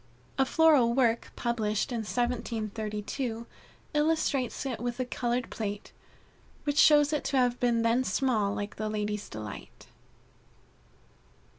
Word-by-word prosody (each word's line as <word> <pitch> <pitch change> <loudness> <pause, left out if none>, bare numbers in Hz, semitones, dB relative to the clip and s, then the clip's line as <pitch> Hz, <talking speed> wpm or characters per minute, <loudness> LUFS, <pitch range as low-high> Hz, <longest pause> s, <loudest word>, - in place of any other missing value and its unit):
A 270 - +5
floral 290 -8 +4
work 235 -3 +1
published 225 0 -1
in 235 - -1
1732, 225 0 -3 0.5
illustrates 295 -5 0
it 260 -4 -3
with 240 +1 -3
a 255 - 0
colored 245 0 -2
plate, 205 -2 -5 0.7
which 290 -1 0
shows 295 0 +6
it 300 - 0
to 275 - 0
have 245 -1 +2
been 235 -2 +2
then 230 +3 +3
small 215 -3 0
like 205 +1 -5
the 215 0 -2
Ladies' 210 -1 -3
Delight. 105 -1 -9
235 Hz, 125 wpm, -29 LUFS, 215-260 Hz, 0.7 s, shows